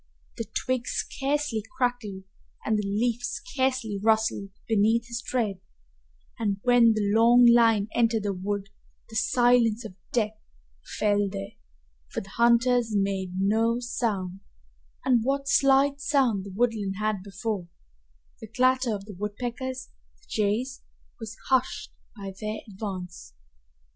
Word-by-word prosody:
The 230 Hz, -, -3 dB
twig 255 Hz, -1 st, -1 dB
scarcely 275 Hz, -4 st, -1 dB, 0.2 s
crackled 245 Hz, -7 st, -1 dB, 0.4 s
and 220 Hz, -, +2 dB
the 210 Hz, -1 st, -1 dB
leaf 230 Hz, +4 st, 0 dB
scarcely 255 Hz, -, -2 dB
rustled 220 Hz, -2 st, +1 dB, 0.2 s
beneath 225 Hz, +2 st, +3 dB
his 235 Hz, 0 st, -5 dB
tread, 220 Hz, -7 st, -2 dB, 0.8 s
and 205 Hz, -3 st, -1 dB
when 245 Hz, -2 st, +5 dB
the 205 Hz, -2 st, 0 dB
long 235 Hz, +2 st, +6 dB
line 230 Hz, -3 st, +5 dB
entered 230 Hz, -2 st, +2 dB
the 200 Hz, -1 st, -1 dB
wood 200 Hz, +1 st, -3 dB, 0.4 s
the -, -, -9 dB
silence 240 Hz, 0 st, +3 dB
of 210 Hz, -, -8 dB, 0.2 s
death 215 Hz, -2 st, 0 dB, 0.6 s
fell 205 Hz, -1 st, +2 dB
there, 195 Hz, +1 st, -6 dB, 0.6 s
for -, -, -3 dB
the 195 Hz, -, -13 dB
hunters 235 Hz, 0 st, +3 dB
made 195 Hz, -2 st, -1 dB
no 225 Hz, +4 st, +2 dB
sound, 205 Hz, -7 st, -2 dB, 0.7 s
and 245 Hz, -3 st, +3 dB
what 275 Hz, +2 st, -1 dB
slight 275 Hz, 0 st, +4 dB
sound 255 Hz, -10 st, +1 dB
the 200 Hz, -, -8 dB
woodland 215 Hz, -4 st, 0 dB
had 215 Hz, -2 st, -1 dB
before 195 Hz, -1 st, -4 dB, 0.7 s
the 220 Hz, -, -9 dB
clatter 255 Hz, 0 st, +2 dB
of 195 Hz, -1 st, -8 dB
the 210 Hz, -, -9 dB
woodpeckers 245 Hz, +6 st, -5 dB, 0.3 s
and -, -, -27 dB
jays 225 Hz, +5 st, -1 dB, 0.4 s
was 225 Hz, 0 st, -8 dB
hushed 260 Hz, -1 st, +1 dB, 0.3 s
by 195 Hz, -1 st, -6 dB
their 215 Hz, 0 st, -3 dB
advance. 190 Hz, -4 st, -7 dB
225 Hz, 130 wpm, -26 LUFS, 205-245 Hz, 0.8 s, long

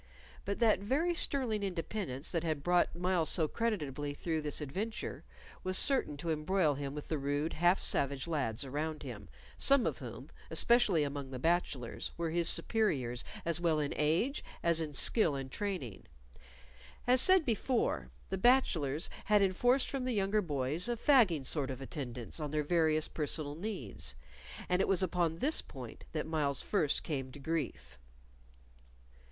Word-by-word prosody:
But 200 Hz, +1 st, -2 dB
that 225 Hz, -5 st, +3 dB
very 280 Hz, -, 0 dB
sterling 255 Hz, -10 st, +1 dB
independence 175 Hz, -6 st, -3 dB
that 165 Hz, -2 st, -1 dB
had 155 Hz, -4 st, -2 dB
brought 175 Hz, 0 st, +2 dB
Myles 175 Hz, -2 st, +1 dB
so 160 Hz, -3 st, +4 dB
creditably 145 Hz, -, -2 dB
through 160 Hz, 0 st, -2 dB
this 150 Hz, -1 st, -3 dB
adventure 200 Hz, -, -4 dB, 0.4 s
was 185 Hz, 0 st, 0 dB
certain 265 Hz, -, +3 dB
to 165 Hz, +3 st, -3 dB
embroil 155 Hz, +1 st, +1 dB
him 140 Hz, 0 st, -5 dB
with 150 Hz, -, -7 dB
the 155 Hz, -, -2 dB
rude, 145 Hz, +3 st, -1 dB
half 175 Hz, +3 st, +3 dB
savage 140 Hz, 0 st, +1 dB
lads 140 Hz, -6 st, -1 dB
about 150 Hz, +3 st, -3 dB
him, 105 Hz, -, -8 dB, 0.3 s
some 275 Hz, -2 st, +4 dB
of -, -, -2 dB
whom, -, -, -9 dB, 0.2 s
especially 220 Hz, -10 st, +3 dB
among 140 Hz, -1 st, -4 dB
the 130 Hz, -, -6 dB
bachelors, 140 Hz, -5 st, -1 dB
were 170 Hz, -1 st, -2 dB
his 170 Hz, 0 st, +3 dB
superiors 135 Hz, -, 0 dB, 0.2 s
as 170 Hz, 0 st, 0 dB
well 165 Hz, -3 st, +2 dB
in 145 Hz, -1 st, -1 dB
age 165 Hz, -, +1 dB, 0.2 s
as 170 Hz, -1 st, +4 dB
in 155 Hz, -2 st, -3 dB
skill 160 Hz, -, +3 dB
and 135 Hz, -1 st, -5 dB
training. 180 Hz, -, -4 dB, 1.0 s
As 250 Hz, +1 st, +6 dB
said 370 Hz, -1 st, +5 dB
before, 225 Hz, -, 0 dB, 0.2 s
the 190 Hz, -, -2 dB
bachelors 170 Hz, -, +3 dB, 0.2 s
had 210 Hz, -1 st, +4 dB
enforced 245 Hz, +8 st, +2 dB
from 270 Hz, -2 st, -3 dB
the 255 Hz, -, 0 dB
younger 205 Hz, 0 st, +1 dB
boys 150 Hz, -, -2 dB
a 240 Hz, -, -1 dB
fagging 215 Hz, -, +4 dB
sort 140 Hz, -1 st, -1 dB
of 130 Hz, -1 st, -5 dB
attendance 125 Hz, -2 st, -6 dB
on 150 Hz, -1 st, -3 dB
their 150 Hz, +1 st, -1 dB
various 155 Hz, -1 st, +2 dB
personal 150 Hz, -1 st, -2 dB
needs, 150 Hz, -, -3 dB, 0.5 s
and 180 Hz, +1 st, +2 dB
it -, -, +1 dB
was 195 Hz, -1 st, +3 dB
upon 170 Hz, -2 st, 0 dB
this 295 Hz, -, +1 dB
point 125 Hz, -4 st, -10 dB
that 155 Hz, -, -2 dB
Myles 150 Hz, -4 st, -1 dB
first 160 Hz, -8 st, +1 dB
came 135 Hz, -4 st, -4 dB
to -, -, -10 dB
grief. 135 Hz, -, -4 dB
160 Hz, 160 wpm, -33 LUFS, 145-200 Hz, 1.0 s, As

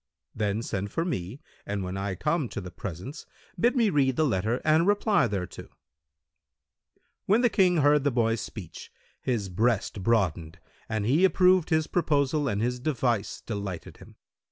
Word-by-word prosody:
Then 105 Hz, +1 st, -1 dB
send 100 Hz, -2 st, -3 dB
for 165 Hz, -, -1 dB
me 110 Hz, -, -4 dB, 0.2 s
and, 100 Hz, -1 st, -3 dB
when 90 Hz, +1 st, -4 dB
I 95 Hz, 0 st, -3 dB
come 150 Hz, -, -1 dB
to -, -, -5 dB
the 90 Hz, -2 st, -8 dB
presence, 95 Hz, -, -7 dB, 0.3 s
bid 240 Hz, +8 st, +3 dB
me 230 Hz, -5 st, +3 dB
read 135 Hz, -3 st, +2 dB
the 155 Hz, -, +2 dB
letter 110 Hz, 0 st, 0 dB
and 155 Hz, +3 st, +4 dB
reply 205 Hz, -, +3 dB
thereto." 95 Hz, -4 st, -5 dB, 1.6 s
When 215 Hz, +5 st, +4 dB
the 245 Hz, -3 st, +3 dB
King 180 Hz, -3 st, +3 dB
heard 145 Hz, -1 st, +4 dB
the 145 Hz, -, +3 dB
boy's 115 Hz, -3 st, +1 dB
speech, 100 Hz, -8 st, -9 dB, 0.3 s
his 115 Hz, -6 st, -1 dB
breast 105 Hz, +1 st, 0 dB
broadened 90 Hz, -6 st, 0 dB, 0.3 s
and 110 Hz, -2 st, -1 dB
he 145 Hz, -, +3 dB
approved 185 Hz, -2 st, +4 dB
his 160 Hz, -2 st, +2 dB
proposal 150 Hz, -3 st, +1 dB
and 105 Hz, -3 st, -1 dB
his 125 Hz, +1 st, -1 dB
device 120 Hz, -6 st, -1 dB
delighted 100 Hz, -5 st, -6 dB
him. -, -, -15 dB
120 Hz, 160 wpm, -27 LUFS, 100-155 Hz, 1.6 s, and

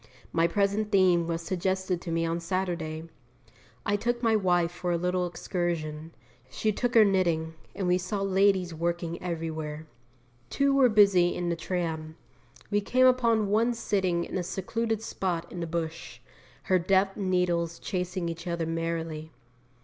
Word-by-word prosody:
My 165 Hz, 0 st, +3 dB
present 200 Hz, +4 st, 0 dB
theme 180 Hz, -4 st, +4 dB
was 165 Hz, 0 st, -2 dB
suggested 185 Hz, 0 st, -1 dB
to 170 Hz, -, -5 dB
me 165 Hz, 0 st, +1 dB
on 165 Hz, +1 st, -1 dB
Saturday. 170 Hz, -3 st, -2 dB, 0.8 s
I 205 Hz, -, +2 dB
took 240 Hz, +3 st, -1 dB
my 225 Hz, -1 st, +4 dB
wife 175 Hz, -4 st, +2 dB
for 175 Hz, 0 st, -3 dB
a 170 Hz, -, +2 dB
little 180 Hz, +1 st, 0 dB
excursion; 165 Hz, -3 st, -3 dB, 0.3 s
she 215 Hz, +10 st, 0 dB
took 245 Hz, +4 st, -2 dB
her 220 Hz, -2 st, +8 dB
knitting, 170 Hz, -5 st, +1 dB, 0.2 s
and 195 Hz, -, -2 dB
we 180 Hz, 0 st, +3 dB
saw 195 Hz, +2 st, -3 dB
ladies 190 Hz, -2 st, +2 dB
working 170 Hz, +1 st, -2 dB
everywhere. 160 Hz, -3 st, -4 dB, 0.6 s
Two 280 Hz, 0 st, +2 dB
were 270 Hz, -2 st, +5 dB
busy 200 Hz, -5 st, +5 dB
in 175 Hz, -1 st, -2 dB
the 170 Hz, -, 0 dB
tram; 160 Hz, -2 st, -3 dB, 0.6 s
we 205 Hz, 0 st, +2 dB
came 255 Hz, +5 st, +3 dB
upon 230 Hz, -5 st, +3 dB
one 230 Hz, +3 st, +2 dB
sitting 190 Hz, -6 st, 0 dB
in -, -, -3 dB
a -, -, 0 dB
secluded 220 Hz, +5 st, -2 dB
spot 180 Hz, -6 st, -2 dB
in 180 Hz, -, -6 dB
the 170 Hz, -, -3 dB
bush, 160 Hz, -8 st, -4 dB, 0.4 s
her 185 Hz, -1 st, +3 dB
deft 195 Hz, +2 st, +2 dB
needles 180 Hz, -3 st, 0 dB
chasing 180 Hz, -2 st, -3 dB
each 170 Hz, +1 st, -6 dB
other 170 Hz, -1 st, -1 dB
merrily. 165 Hz, -1 st, -3 dB
180 Hz, 155 wpm, -28 LUFS, 165-200 Hz, 0.8 s, her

